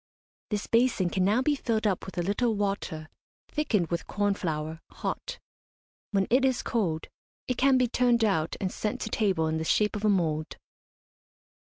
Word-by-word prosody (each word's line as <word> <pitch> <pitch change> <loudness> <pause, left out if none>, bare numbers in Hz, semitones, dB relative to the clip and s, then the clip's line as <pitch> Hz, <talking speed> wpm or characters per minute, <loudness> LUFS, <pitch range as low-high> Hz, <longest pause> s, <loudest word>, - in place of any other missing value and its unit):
This 210 -1 -2
basin 230 -7 +2
can 185 - +1
now 215 +7 +3
be 300 - +3
filled 230 -6 -1
up 195 -3 0
with 190 - -9
a 175 - +1
little 220 +5 +1
water 195 -6 -2 0.4
thickened 220 - 0
with 170 - -2
corn 205 -1 +1
flour, 160 -3 -3
hot. - - -4 0.7
When 195 -2 +1
it 255 +2 +4
is 260 -2 +2
cold, 170 -9 -1 0.4
it 250 - -1
can 270 0 +4
be 250 -1 +3
turned 240 -1 +3
out 160 -6 0
and 190 -2 -1
sent 210 - -3
to - - -3
table 190 -7 +1
in 160 0 0
the - - -2
shape 210 +6 +2
of 210 - -4
a 215 - +4
mould. 160 -5 0
205 Hz, 180 wpm, -28 LUFS, 175-235 Hz, 0.7 s, it